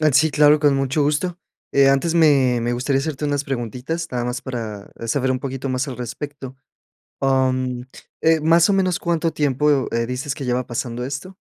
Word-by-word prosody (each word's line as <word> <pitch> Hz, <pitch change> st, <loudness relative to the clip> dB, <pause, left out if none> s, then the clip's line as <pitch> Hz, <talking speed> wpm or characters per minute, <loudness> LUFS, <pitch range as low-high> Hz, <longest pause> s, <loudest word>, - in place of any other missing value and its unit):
Ah, 155 Hz, -1 st, +4 dB
sí, 155 Hz, +4 st, +4 dB
claro, 150 Hz, 0 st, +5 dB
con 145 Hz, -1 st, +3 dB
mucho 135 Hz, +2 st, 0 dB
gusto. 170 Hz, +4 st, -1 dB, 0.3 s
Eh, 140 Hz, -1 st, +5 dB
antes 140 Hz, +5 st, +2 dB
me 140 Hz, -7 st, +4 dB
me 120 Hz, +1 st, -1 dB
gustaría 130 Hz, +3 st, 0 dB
hacerte 150 Hz, 0 st, -3 dB
unas 145 Hz, -1 st, -1 dB
preguntitas, 135 Hz, +6 st, -4 dB
nada 125 Hz, -1 st, -2 dB
más 125 Hz, +1 st, -3 dB
para 110 Hz, -6 st, -6 dB, 0.2 s
saber 130 Hz, +2 st, 0 dB
un 130 Hz, -, 0 dB
poquito 135 Hz, 0 st, -5 dB
más 130 Hz, +2 st, -1 dB
al 130 Hz, -4 st, -6 dB
respecto. 130 Hz, +2 st, -7 dB, 0.7 s
Mm, 130 Hz, -2 st, +1 dB, 0.4 s
eh, 160 Hz, 0 st, +4 dB
más 165 Hz, +4 st, +4 dB
o 200 Hz, -, +4 dB
menos, 185 Hz, -2 st, +1 dB
¿cuánto 165 Hz, -1 st, 0 dB
tiempo, 145 Hz, -1 st, +1 dB
eh, 115 Hz, -, +1 dB
dices 130 Hz, +3 st, -3 dB
que 140 Hz, -, -6 dB
lleva 125 Hz, 0 st, -1 dB
pasando 120 Hz, 0 st, -4 dB
esto? 140 Hz, +8 st, -6 dB
135 Hz, 190 wpm, -21 LUFS, 125-150 Hz, 0.7 s, claro